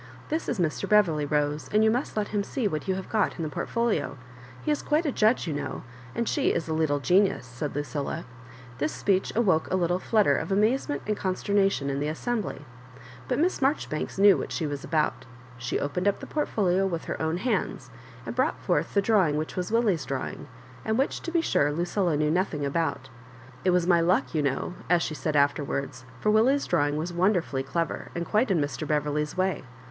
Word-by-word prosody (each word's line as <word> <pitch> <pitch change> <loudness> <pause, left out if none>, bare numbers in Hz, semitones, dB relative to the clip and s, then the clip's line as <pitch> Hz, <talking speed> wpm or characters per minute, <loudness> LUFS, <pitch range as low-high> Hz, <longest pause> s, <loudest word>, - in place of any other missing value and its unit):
This 315 +2 -2
is 240 - -1
Mr. 170 -4 -1
Beverley, 170 -8 +4
Rose, 150 -1 0
and 215 +1 +4
you 220 - +5
must 245 0 -2
let 210 -1 0
him 205 -1 0
see 245 +1 -1
what 155 -4 -3
you 190 - +1
have 190 - -5
got 220 - 0
in 165 - -3
the 155 - -2
port 145 - -4
folia 230 -13 0 0.5
He 305 - 0
is 295 - 0
quite 310 +3 +1
a 295 - +1
judge, 225 0 +2
you 160 - -2
know; 145 - -4 0.3
and 235 - -1
she 285 - +2
is 165 - -2
a 160 - -1
little 155 -2 +1
genius," 185 +1 +2
said 125 +4 -5
Lucilla. 145 +2 -3 0.5
This 150 +2 0
speech 190 -1 0
awoke 190 -9 +2
a - - +2
little 175 0 +1
flutter 215 +1 +3
of - - -3
amazement 225 +9 +1
and 210 - 0
conster 190 +1 -2
nation 195 -9 +2
in 135 - -2
the 145 - -1
assembly; 195 - -3 0.6
but 250 - 0
Miss 345 +3 +1
Marjoribanks 265 - -1
knew 200 0 +7
what - - -5
she 165 - -2
was 145 -1 -4
about 155 0 0 0.3
She 120 +1 -2
opened 180 +7 -1
up 200 - +2
the - - -7
portfolio 195 - +1
with 170 -3 -3
her - - -4
own 160 +1 0
hands, 245 +7 -2 0.3
and - - -5
brought - - +1
forth - - -1
the 200 - +4
drawing 190 -9 +3
which 155 +1 -3
was 180 +2 -3
Willie's 210 - +2
drawing, 135 +1 -4 0.4
and 220 +1 0
which, 270 - 0
to 335 - -5
iHd 335 -1 +2
sure, 145 - +2
Lucilla 175 +1 0
knew 150 0 +1
nothing 175 -3 0
afout 140 -3 -1 0.5
"It - - +3
was 180 -1 +3
my 175 -2 +4
luck, 165 -7 +1
you 155 - +1
know,'' 140 +5 -1 0.2
as 175 -1 +4
she - - -3
said 155 0 -2
after 145 +1 +3
wards; 135 -2 -4
for 215 - +2
Willie's 255 +7 +3
drawing 145 -3 +1
was 170 +3 -3
wonderfully 175 -6 +1
clever, 165 +5 -3
and 170 0 -2
quite 215 +7 +2
in 185 -4 +2
Mr. 145 +1 -2
Beverley's 150 +1 -1
way. 185 -2 0
175 Hz, 215 wpm, -27 LUFS, 150-210 Hz, 0.6 s, knew